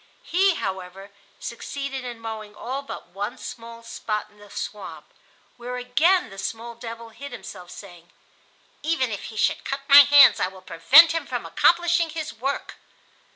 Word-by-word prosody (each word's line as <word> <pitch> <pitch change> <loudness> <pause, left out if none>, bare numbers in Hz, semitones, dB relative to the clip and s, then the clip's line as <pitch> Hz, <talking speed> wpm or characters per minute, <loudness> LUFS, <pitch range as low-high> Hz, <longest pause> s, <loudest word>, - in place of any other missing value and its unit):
He, 375 +1 +2
however, 190 - -6 0.3
succeeded 270 +3 -6
in 240 -2 -7
mowing 220 -2 -7
all 265 +3 -5
but 280 - -9
one 205 +6 -5
small 230 0 -9
spot 215 -2 -4
in 210 - -24
the 205 0 -15
swamp, 210 0 -7 0.5
where 245 +1 -6
again 275 - +2
the 195 - -10
small 230 +3 -5
devil 230 0 -9
hid 280 +5 -10
himself, 180 -3 -10
saying: 175 -4 -13 0.7
"Even 295 -6 0
if 205 - -5
he 220 - -9
should - - +1
cut 275 0 -4
my 280 0 +10
hands 285 0 +8
I 180 - +1
will 190 0 -13
prevent 260 - +6
him 330 0 -3
from - - -4
accomplishing 345 -1 +2
his 315 -1 -5
work." 265 +5 -4
235 Hz, 160 wpm, -24 LUFS, 205-280 Hz, 0.7 s, my